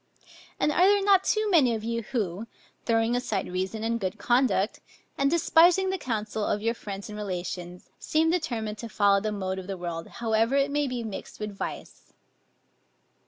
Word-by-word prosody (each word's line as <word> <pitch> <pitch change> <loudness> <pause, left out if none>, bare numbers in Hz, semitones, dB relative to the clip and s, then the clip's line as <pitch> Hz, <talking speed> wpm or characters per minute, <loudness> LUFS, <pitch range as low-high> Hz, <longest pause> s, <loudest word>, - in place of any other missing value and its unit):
And 300 - +2
are 360 +5 +4
there 405 0 +4
not 390 -1 +5
too 430 +1 +1
many 265 -10 +4
of 215 - -5
you 230 +1 -2
who, 215 -3 -3 0.4
throwing 230 0 +2
aside 250 +1 -1
reason 190 +4 -3
and 230 +1 0
good 185 -3 -3
conduct, 240 -4 +1 0.4
and 275 0 +2
despising 340 +3 +4
the 380 - -2
counsel 215 -5 -3
of 205 - 0
your 230 +1 +1
friends 200 -2 -7
and 210 - -8
relations, 180 -2 -5
seem 320 +1 +1
determined 230 - -2
to 230 - -6
follow 200 -2 +3
the 215 +1 -2
mode 190 -2 -3
of 185 - -9
the 195 -1 -4
world, 170 -2 -5
however 230 +1 0
it 280 0 +2
may 290 0 +1
be 250 -2 -3
mixed 215 -3 -7
with 210 -1 -5
vice? - - -7
225 Hz, 180 wpm, -27 LUFS, 200-275 Hz, 0.4 s, not